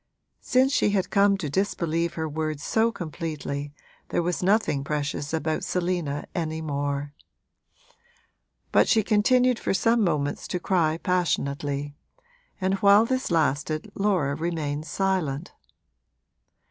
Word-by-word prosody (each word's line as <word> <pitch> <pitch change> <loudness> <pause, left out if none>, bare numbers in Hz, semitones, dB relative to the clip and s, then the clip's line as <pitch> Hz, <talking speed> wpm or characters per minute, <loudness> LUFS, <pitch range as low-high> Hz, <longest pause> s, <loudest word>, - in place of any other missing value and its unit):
Since 260 +2 +2
she 210 - +3
had 200 -2 0
come 200 -1 +4
to 175 -6 -4
disbelieve 170 -1 -1
her 160 -1 -2
word 155 -1 -3
so 225 +9 +1
completely 155 -5 -5 0.4
there 175 - 0
was 175 0 -1
nothing 185 -7 +2
precious 145 0 -3
about 160 0 -1
Selina 175 -6 -2
any 160 -2 -2
more. 145 -1 -3 1.6
But - - +4
she 220 -2 +3
continued 245 +4 +3
for - - -1
some 230 +4 +3
moments 150 -5 -1
to 180 - -2
cry 165 -4 +1
passionately, 145 -5 -1 0.7
and 190 0 +1
while 205 +1 +6
this 260 +2 -1
lasted 155 -1 0
Laura 185 -9 +1
remained 155 -1 -3
silent. 180 -6 -1
165 Hz, 120 wpm, -25 LUFS, 145-195 Hz, 1.6 s, while